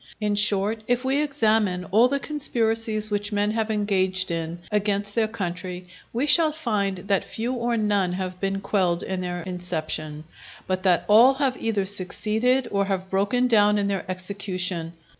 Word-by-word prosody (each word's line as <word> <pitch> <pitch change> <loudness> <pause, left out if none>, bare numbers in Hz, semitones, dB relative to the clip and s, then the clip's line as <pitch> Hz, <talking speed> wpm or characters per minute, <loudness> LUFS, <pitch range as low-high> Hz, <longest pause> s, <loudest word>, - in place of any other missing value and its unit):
In 210 -1 0
short, 210 +1 +3
if 245 +1 0
we 275 +2 +1
examine 220 -10 +1
all 225 +5 +5
the 280 +2 -1
conspiracies 225 -7 -1
which 205 0 -1
men 205 0 +1
have 220 0 -1
engaged 190 -3 +1
in 165 0 -3
against 205 -1 0
their 225 -1 +1
country, 180 -3 -5 0.3
we 245 +5 -1
shall 315 +1 +5
find 210 -11 -1
that 200 -2 +2
few 235 +3 -4
or 240 -1 -1
none 205 -4 +1
have 185 0 -4
been 195 0 -2
quelled 180 -4 0
in 190 -1 -3
their 175 -1 -4
inception, 155 -4 -4 0.4
but 185 0 -2
that 185 -3 +2
all 235 +6 +6
have 270 -2 0
either 210 -4 0
succeeded, 215 +6 +1
or 200 0 +1
have 190 -1 -3
broken 205 +6 +1
down 210 -3 +4
in 205 - 0
their 195 -1 -3
execution. 185 -2 -3
205 Hz, 165 wpm, -24 LUFS, 185-225 Hz, 0.4 s, all